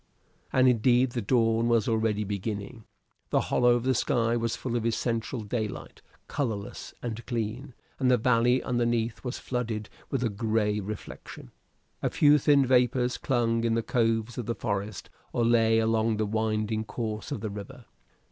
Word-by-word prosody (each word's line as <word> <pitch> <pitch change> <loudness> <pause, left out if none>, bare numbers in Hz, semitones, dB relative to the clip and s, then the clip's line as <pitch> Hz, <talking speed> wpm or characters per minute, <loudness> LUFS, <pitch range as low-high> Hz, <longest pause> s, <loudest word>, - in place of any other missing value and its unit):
And 130 0 +4
indeed 125 +1 +3
the 120 - -2
dawn 115 +1 +2
was 115 -3 +2
already 110 -2 +1
beginning. 105 +3 -5 0.4
The - - +3
hollow 120 0 +5
of 120 - -1
the 130 +1 +2
sky 115 -2 +1
was 115 -1 -1
full 125 -2 -4
of 120 - 0
essential 115 +1 -1
daylight, 110 0 -5 0.3
colorless 110 -8 -4
and 120 -1 -4
clean; 120 +3 -4 0.2
and 130 -2 +2
the 125 - +5
valley 120 +2 +3
underneath 120 -2 -1
was 125 -1 -4
flooded 115 -4 -3 0.2
with 135 -2 -1
a 115 - +1
gray 105 0 0
reflection. 105 +1 -8 0.5
A - - +1
few 150 0 +5
thin 140 -1 +4
vapors 125 0 +2
clung 115 -4 +1
in 115 -1 +1
the 115 - 0
coves 115 0 0
of 120 - -5
the 115 - -1
forest 100 -2 -4 0.2
or 120 - +1
lay 115 -1 +4
along 110 0 +2
the 110 - 0
winding 110 0 -1
course 110 -2 -5
of - - -3
the 110 -2 -3
river. 105 +4 -9
115 Hz, 165 wpm, -28 LUFS, 110-125 Hz, 0.5 s, hollow